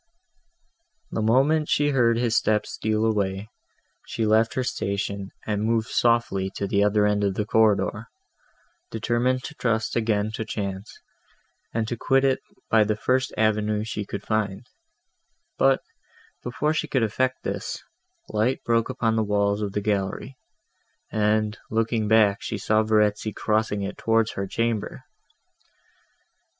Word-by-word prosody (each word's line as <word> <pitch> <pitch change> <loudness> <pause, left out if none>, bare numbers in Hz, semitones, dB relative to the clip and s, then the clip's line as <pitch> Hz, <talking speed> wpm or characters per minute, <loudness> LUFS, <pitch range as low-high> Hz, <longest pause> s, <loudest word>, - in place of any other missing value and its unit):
The - - -2
moment 135 +8 +3
she 145 0 +2
heard 120 -4 +3
his 120 -1 +1
steps 105 -1 +1
steal 110 0 0
away, 100 -1 -1 0.6
she 115 - -2
left 110 +1 +3
her 130 - 0
station 100 -4 -3 0.2
and 105 -1 -1
moved 115 0 0
softly 115 -5 +1
to 100 - -2
the 100 +1 +2
other 105 0 +3
end 105 0 +1
of 100 -2 0
the 105 - -1
corridor, 110 0 +2 0.8
determined 120 +3 0
to 150 - -7
trust 115 -5 -1
again 110 -2 0
to 110 - -4
chance, 100 -2 -5 0.7
and 110 -1 -1
to 120 - -2
quit 135 +3 +2
it 130 -1 +2 0.3
by 110 -1 +4
the 105 0 0
first 130 +4 0
avenue 110 -1 +1
she 110 -1 -4
could 100 0 -6
find; 105 -3 -2 0.9
but, 135 0 +3 0.6
before 145 +5 -1
she 155 0 -1
could 135 -4 +1
effect 130 +4 -1
this, - - -4 0.4
light 115 +5 0
broke 115 0 +1
upon 115 -3 0
the 110 - +2
walls 100 0 +1
of 100 -2 -3
the 105 - -1
gallery, 105 +5 -2 0.8
and, 110 0 +1
looking 115 0 0
back, 105 -2 +4
she 110 - -4
saw 110 +2 +2
Verezzi 105 0 +1
crossing 105 -2 0
it 100 - -5
towards 115 0 +2
her 100 0 -4
chamber. 115 +1 -2
110 Hz, 145 wpm, -25 LUFS, 105-115 Hz, 0.9 s, by